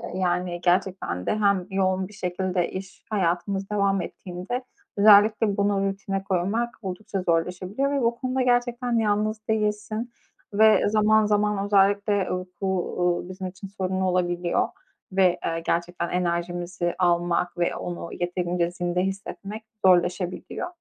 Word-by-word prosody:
yani, 180 -1 -1
gerçekten 180 - 0
de - - +1
hem 200 -3 +2
yoğun 190 -1 +1
bir 210 - -16
şekilde 180 -1 -1
iş 185 0 -8
hayatımız 195 0 -1
devam 200 -2 +1
ettiğinde 185 +10 -5 0.3
özellikle 210 0 +6
bunu 200 -1 +2
rutine 195 0 -3
koymak 200 +6 -1
oldukça 195 +1 -4
zorlaşabiliyor 180 +10 0
ve 280 -2 0
bu 235 0 +2
konuda 255 +1 -1
gerçekten 245 -1 +1
yalnız 215 0 0
değilsin 220 +2 -1 0.4
ve 215 0 +5
zaman 215 0 +4
zaman, 210 -1 +1
özellikle, 200 +1 +3
eee, 200 -2 0 0.3
bu, 195 - 0 0.3
uuu, 175 0 0
bizim 185 0 -5
için 185 +2 -9
sorunlu 190 -1 -2
olabiliyor 175 -1 +1 0.4
ve, 185 -2 +3
eee, 165 0 -1
gerçekten 170 0 -1
enerjimizi 175 0 -2
almak 175 0 +1
ve 175 - 0
onu 175 -1 -5
yeterince 175 -1 -1
zinde 175 0 -1
hissetmek 195 +2 -5 0.2
zorlaşabiliyor. 180 - +1
190 Hz, 130 wpm, -25 LUFS, 180-210 Hz, 0.4 s, özellikle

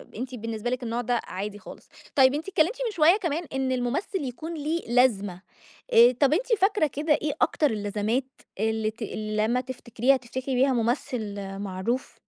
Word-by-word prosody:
أنتِ 255 +2 -5
بالنسبة 225 0 -4
لِك 255 0 -2
النوع 235 +1 -2
ده 245 0 0
عادي 205 +2 -5
خالص، 185 - -12 0.3
طيّب 265 -1 +6
أنتِ 310 +4 -3
اتكلمتِ 370 +6 +2
من 450 - -1
شويّة 340 +2 +5
كمان 340 -3 -2
إن 265 -1 0
الممثّل 265 +8 -1
يكون 310 +7 -6
ليه 315 +2 -2
لازمة، 205 -7 +2 0.5
آآ، 235 +2 +8
طَب 280 0 +4
أنتِ 440 +10 0
فاكرة 390 -5 +3
كده 295 +2 0
إيه 295 0 0
أكتر 300 -6 +2
اللزمات، 210 +4 -1 0.3
اللي 220 0 0
ت 230 - -23
اللي 215 0 -1
لمّا 250 +2 +1
تفتكريها 255 0 0
تفتكري 260 +1 -4
بيها 265 +1 +3
ممثّل 235 -2 -1 0.2
معروف؟ 200 +6 -3
250 Hz, 170 wpm, -26 LUFS, 220-295 Hz, 0.5 s, آآ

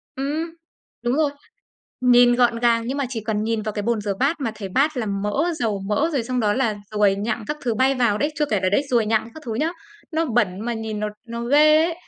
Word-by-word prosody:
Ừm. 300 +5 -2 0.5
Đúng 240 +2 +1
rồi. 300 -2 +2 0.7
Nhìn 245 -1 +6
gọn 240 -1 +3
gàng 230 -1 +3
nhưng 270 +3 -2
mà 280 - 0
chỉ 235 -4 -4
cần 215 -1 -1
nhìn 225 -1 -1
vào 215 0 -3
cái 205 - -3
bồn 230 -1 0
rửa 200 -1 -2
bát 290 +3 +1
mà 245 -5 -1
thấy 200 -3 -6
bát 280 +8 +1
là 230 -3 -1
mỡ, 210 - -1
dầu 215 -4 0
mỡ, 285 +11 +1
rồi 265 -5 0
xong 250 +1 -2
đó 210 -1 +2
là 230 -4 0
ruồi 205 -2 +3
nhặng 215 +2 -3
các 300 - -3
thứ 235 -4 -1
bay 265 +4 +3
vào 235 -5 +2
đấy. 295 +6 0
Chưa 300 - +3
kể 205 - +1
là 185 - +3
đấy, 205 +9 +2
ruồi 230 -3 +2
nhặng 220 +1 +1
các 315 - -10
thứ 225 - -3
nhớ, 315 +8 0 0.4
nó 325 +1 +1
bẩn 215 - 0
mà 240 +2 -2
nhìn 220 -1 -4
nó 210 - -1 0.2
nó 235 0 -5
ghê 305 +4 +5
ấy. 335 -1 -1
235 Hz, 255 wpm, -22 LUFS, 215-275 Hz, 0.7 s, Nhìn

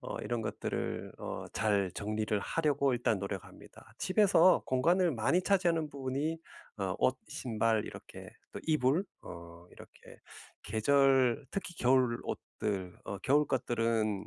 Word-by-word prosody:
어 - - -6
이런 120 -2 -3
것들을 - - -4
어 - - -5 0.2
잘 100 -3 +1
정리를 105 0 -1
하려고 145 -3 +1
일단 115 -4 +1
노력합니다. 100 -1 -8
집에서 185 -3 +4
공간을 170 +7 +2
많이 120 +10 +2
차지하는 170 -5 +2
부분이 140 +4 -2 0.4
어 95 -2 -1
옷, 130 - +2
신발 115 -7 0
이렇게 - - -10 0.2
또 - - -6
이불, 155 +2 +2 0.2
어 85 0 -11
이렇게 - - -15 0.4
계절 135 +2 +3
특히 185 -3 -5
겨울 125 -1 +3
옷들, 95 -4 -4
어 100 - -5
겨울 145 +7 +3
것들은 115 -5 0
125 Hz, 270 characters per minute, -32 LUFS, 110-150 Hz, 0.4 s, 집에서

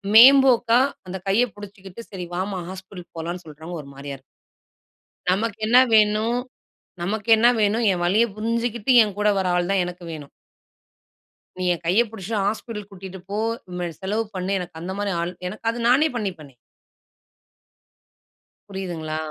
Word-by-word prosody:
மேம்போக்கா 245 -1 +7 0.3
அந்தக் 190 +1 -7
கையப் 230 +3 +2
புடிச்சுகிட்டு, 200 0 -10
சரி 185 -3 -6
வாம்மா, 190 +1 -2
ஹாஸ்பிட்டல் 185 -2 -10
போலாம்ன்னு 170 +2 -5
சொல்றவங்க 160 +3 -8
ஒரு 140 - -13
மாரியா 140 0 -7
இரு 135 - -26 1.1
நமக்கு 205 +3 0
என்ன 240 +3 +5 0.2
வேணும்? 215 +2 +3 0.7
நமக்கு 205 +5 -3
என்ன 230 +2 +5
வேணும்? 215 +2 +2
என் 175 -1 -2
வலிய 200 +6 +4
புரிஞ்சுகிட்டு, 230 +1 -1
என் 205 -2 -6
கூட 210 0 +2
வர 190 - -1
ஆள் 175 +1 0
தான் 195 -2 +2
எனக்கு 180 0 -8
வேணும். 150 -3 -9 1.3
நீ - - -2
என் 175 - -7
கைய 185 +7 +4
புடிச்சுட்டு 215 0 -3
ஹாஸ்பிட்டல் 210 -1 -4
கூட்டிட்டு 190 -1 -9
போ, 205 - -3 0.4
ம 175 -1 -2
செலவு 210 +4 -1
பண்ணு, 185 +1 -2
எனக்கு 175 -3 -8
அந்த 180 +3 -5
மாரி 205 -1 -1
ஆள் 175 +1 -3
எனக்கு 210 +4 -8
அது 235 - -6
நானே 275 +6 +5
பண்ணிப்பேனே. 175 - -5 2.2
புரியுதுங்களா? 175 -5 -5
195 Hz, 145 wpm, -23 LUFS, 180-220 Hz, 2.2 s, மேம்போக்கா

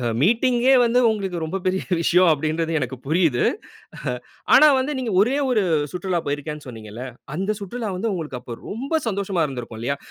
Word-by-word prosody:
அ 120 - -3 0.2
மீட்டிங்யே 240 - +3
வந்து 240 +1 +3
உங்களுக்கு 190 -6 -2
ரொம்ப 160 +4 -3
பெரிய 185 0 0 0.2
விஷயம். 175 +2 +4
அப்படின்றது 160 +2 -1
எனக்கு 130 -1 -3
புரியுது. 155 -6 +2 1.1
ஆனா 305 - +8
வந்து, 275 +3 -1
நீங்க 235 -5 -2
ஒரே 250 +7 +3
1 220 -5 +3 0.3
சுற்றுலா 180 -1 -1
போயிருக்கேன்னு 145 +1 -4
சொன்னீங்கள்ல. 115 0 -8 0.3
அந்த 195 +5 -1
சுற்றுலா 220 +3 -4
வந்து 225 +4 -1
உங்களுக்கு 150 -7 -5
அப்ப 120 -2 -8
ரொம்ப 275 +9 -2
சந்தோஷமா 195 -4 0
இருந்திருக்கும் 120 -4 -7
இல்லையா, 140 +4 -1
180 Hz, 160 wpm, -22 LUFS, 145-220 Hz, 1.1 s, ஆனா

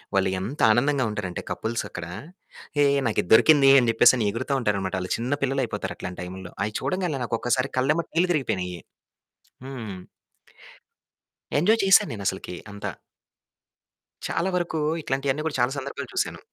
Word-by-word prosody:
వాళ్ళు 95 -1 +3
ఎంత 120 +11 -5
ఆనందంగా 135 +3 +2
ఉంటారంటే 100 -4 -4
కపుల్స్ 115 +1 -2
అక్కడ 90 - -6 0.7
హేయ్! 140 -1 +4
నాకిది 105 -5 -1
దొరికింది 140 +3 +7
అని 120 -2 +1
జెప్పేసని 115 0 +5
ఎగురుతా 130 +5 -3
ఉంటారనమాట. 100 -4 -1
ఆళ్ళు 90 - -5
చిన్న 120 +4 -2
పిల్లలయిపోతారు 135 0 -2
అట్లాంటి 90 -1 -6
టైంలో. 90 0 -8
అయ్యి 105 0 -3
చూడంగానే 180 -7 -1
నాకు 115 - -1
ఒక్కసారి 130 +2 0
కళ్ళెంబట 150 +6 +1
నీళ్లు 175 +2 +3
తిరిగిపోయినయి. 90 - -2 0.9
హ్మ్. 115 -8 -6 1.6
ఎంజాయ్ 215 +7 +3
చేశాను 195 -1 +5
నేను 105 -3 -6
అసలకి 95 -1 -3 0.2
అంత. 100 0 -8 1.4
చాలా 185 +3 -1
వరకు 170 -2 -2 0.2
ఇట్లాంటివన్నీ 135 +2 -1
కూడా 150 - -3
చాలా 125 +2 +2
సందర్భాలు 140 0 -6
చూసాను. - - -1
125 Hz, 140 wpm, -25 LUFS, 100-145 Hz, 1.6 s, దొరికింది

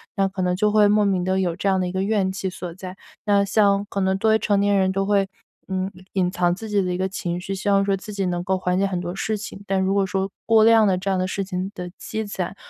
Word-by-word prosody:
那 195 -1 +2
可 190 -1 -4
能 180 0 +1
就 210 +2 +2
会 210 -1 +5
莫 210 +1 +3
名 190 -3 +1
的 190 +1 0
有 175 -3 0
这 200 - -3
样 190 -1 +3
的 180 - 0
一 - - -4
个 190 0 -1
怨 195 -2 +1
气 190 0 -4
所 180 -1 -6
在。 185 0 -8 0.3
那 200 -1 +3
像 200 -1 +3
可 200 - -3
能 190 0 +2
作 220 - +2
为 220 - +5
成 205 -2 +1
年 200 0 +2
人 190 -1 +2
都 195 +1 0
会， 200 -1 +2 0.4
嗯， 190 0 -2 0.2
隐 185 -2 +1
藏 175 -1 +1
自 220 +4 -7
己 205 -2 +2
的 180 -1 -1
一 - - -2
个 190 - 0
情 175 -2 -4
绪， 195 +1 -4
希 195 +2 -6
望 200 0 +4
说 195 -1 +1
自 210 +2 -9
己 195 -2 -1
能 175 -1 -2
够 190 +1 0
缓 180 0 0
解 195 - +2
很 185 -2 -2
多 175 0 -5
事 215 +2 -1
情。 200 -1 -8
但 195 -1 0
如 190 +1 +1
果 195 -1 +2
说 190 +1 -2 0.2
过 225 -1 +5
量 225 -1 +6
的 190 - +3
这 195 - -3
样 190 - +1
的 185 - 0
事 195 +1 -2
情 185 0 -4
的 180 0 -6
积 220 0 -4
攒 195 -2 -4
195 Hz, 315 characters per minute, -23 LUFS, 185-200 Hz, 0.4 s, 量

